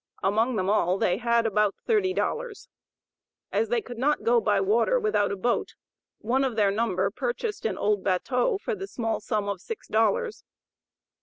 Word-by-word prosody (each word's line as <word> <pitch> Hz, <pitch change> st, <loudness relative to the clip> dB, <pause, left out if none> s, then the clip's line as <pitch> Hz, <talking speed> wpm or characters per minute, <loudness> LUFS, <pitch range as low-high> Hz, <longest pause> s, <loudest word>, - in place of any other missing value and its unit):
Among 220 Hz, +6 st, +2 dB
them 185 Hz, -3 st, -1 dB
all 190 Hz, -3 st, +2 dB
they 180 Hz, -1 st, +1 dB
had 235 Hz, 0 st, +1 dB
about 210 Hz, -2 st, +2 dB
thirty 420 Hz, -5 st, +2 dB
dollars. 470 Hz, +3 st, -3 dB, 0.8 s
As 225 Hz, -, 0 dB
they 235 Hz, -1 st, 0 dB
could 240 Hz, -2 st, -9 dB
not 295 Hz, +4 st, +1 dB
go 235 Hz, 0 st, +3 dB
by 205 Hz, -2 st, +2 dB
water 230 Hz, -, +2 dB
without 425 Hz, -, +1 dB
a -, -, -1 dB
boat, 235 Hz, +5 st, -1 dB, 0.4 s
one 255 Hz, +5 st, 0 dB
of 260 Hz, -4 st, -1 dB
their 205 Hz, -2 st, +3 dB
number 200 Hz, -3 st, 0 dB
purchased 255 Hz, -, -3 dB
an 190 Hz, -4 st, -4 dB
old 205 Hz, -1 st, 0 dB
batteau 250 Hz, -, +1 dB
for 465 Hz, -, -3 dB
the 390 Hz, -1 st, -5 dB
small 225 Hz, -, -2 dB
sum 210 Hz, -1 st, -2 dB
of 200 Hz, -3 st, -3 dB
six 455 Hz, -, -7 dB
dollars. 475 Hz, -2 st, 0 dB
230 Hz, 175 wpm, -26 LUFS, 205-295 Hz, 0.8 s, go